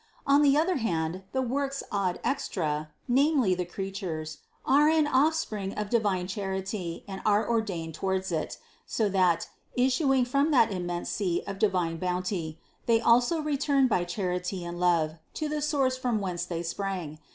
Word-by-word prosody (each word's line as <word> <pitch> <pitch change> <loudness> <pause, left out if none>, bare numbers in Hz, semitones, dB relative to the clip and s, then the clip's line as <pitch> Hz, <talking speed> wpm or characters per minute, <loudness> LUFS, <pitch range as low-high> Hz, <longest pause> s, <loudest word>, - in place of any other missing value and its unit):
On 280 +1 +5
the 285 -1 +5
other 335 +3 +2
hand 170 -6 -1
the 260 0 0
works 275 +2 -2
ad 195 -3 0
extra, 155 - -1 0.2
namely 265 -5 +3
the 180 0 -2
creatures, 175 -5 -5 0.3
are 290 +3 +5
an 315 -1 +4
off 295 +3 +3
spring 205 -10 -3
of 210 -1 -4
divine 205 -6 +1
charity 190 -2 -4
and 190 -1 -6
are 210 0 +3
ordained 195 -9 -1
towards 190 +2 -2
it, 160 -2 -2 0.3
so 220 - +1
that, 180 -4 +2 0.3
issuing 260 +1 +3
from 275 +5 +2
that 240 -7 +4
immense 175 -2 -3
sea 180 -4 -1
of 195 -1 -6
divine 180 -5 +1
bounty, 180 -2 -2 0.3
they 230 -1 +4
also 245 +8 +3
return 280 -2 +2
by 185 -7 +1
charity 180 0 -3
and 175 0 -6
love 165 -3 +2 0.2
to 310 - -2
the 300 0 -2
source 275 -4 +1
from 245 -4 0
whence 180 -3 -3
they 170 -1 -4
sprang. 170 -3 -4
195 Hz, 165 wpm, -28 LUFS, 175-260 Hz, 0.3 s, On